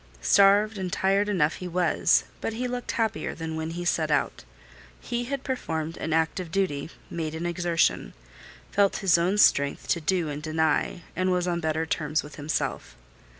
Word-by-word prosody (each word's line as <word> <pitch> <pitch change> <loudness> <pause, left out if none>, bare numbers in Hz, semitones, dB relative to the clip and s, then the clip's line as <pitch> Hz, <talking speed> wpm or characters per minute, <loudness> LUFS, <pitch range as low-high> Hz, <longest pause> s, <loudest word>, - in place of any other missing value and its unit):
Starved 200 - +5
and 185 -1 -3
tired 195 +3 +1
enough 165 -6 +1
he 180 - -6
was: 180 0 +2 0.2
but 225 - -2
he 250 +3 -2
looked 245 0 -4
happier 220 -9 -1
than 160 -1 -5
when 160 0 -3
he 175 +1 -5
set 160 -2 +1
out. 150 - 0 0.6
He 240 0 -3
had 275 +1 -4
performed 165 - -3
an 160 - -4
act 160 +3 +1
of 180 -3 -5
duty; 160 -6 -1 0.2
made 160 -2 -3
an 165 +2 -4
exertion; 170 - 0 0.6
felt 200 -1 +3
his 175 -2 +5
own 185 +4 +1
strength 140 -8 +3
to 170 - +1
do 175 +1 0
and 145 0 -5
deny, 160 +2 0
and 185 +2 +1
was 180 0 0
on 175 -1 0
better 160 0 -1
terms 150 -1 -1
with 150 - -11
himself. 150 - -3
170 Hz, 180 wpm, -26 LUFS, 160-195 Hz, 0.6 s, Starved